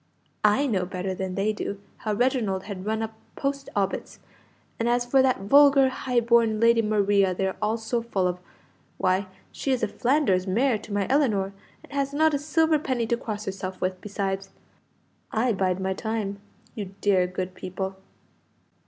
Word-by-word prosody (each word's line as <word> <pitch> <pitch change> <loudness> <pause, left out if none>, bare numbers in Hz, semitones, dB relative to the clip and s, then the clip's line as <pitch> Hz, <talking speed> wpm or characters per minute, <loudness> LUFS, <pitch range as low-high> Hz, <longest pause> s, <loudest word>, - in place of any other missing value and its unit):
I 210 +7 +4
know 190 -9 0
better 185 0 -3
than 185 0 -4
they 205 +2 +1
do 200 -1 -4 0.2
how 215 - -2
Reginald 220 -5 +1
has 205 - -6
run 215 +4 -2
up 220 0 -5 0.2
post 275 0 -3
obits, 195 -1 -2 0.6
and 230 +1 +1
as 245 0 +2
for 265 +2 +4
that 260 -5 +2
vulgar 275 +4 +6
high 250 -2 0
born 230 -2 +3
Lady 230 0 +5
Maria 200 -3 +2
they 190 - 0
are 190 - -1
all 215 +2 +1
so 230 +1 -2
full 200 -6 0
of, 180 0 -2 0.6
why, 185 +1 +1 0.2
she 275 - -2
is 255 - 0
a - - +3
Flanders 240 -9 +1
mare 230 +4 +2
to 215 - -12
my 205 -1 0
Ellinor, 220 -9 +1 0.3
and - - -15
has 280 0 -1
not 315 +1 +4
a 285 - +1
silver 310 +1 +2
penny 255 -5 -1
to 235 - +1
cross 215 -2 -5
herself 190 -1 -5
with, 185 0 -2
besides! 195 -1 -3 0.8
I 230 +2 +1
bide 185 -1 0
my 190 0 -1
time, 205 -1 -3 0.3
you 195 -3 -6
dear 190 -3 +3
good 185 0 -4
people!" 190 +1 -5
215 Hz, 180 wpm, -26 LUFS, 190-245 Hz, 0.8 s, vulgar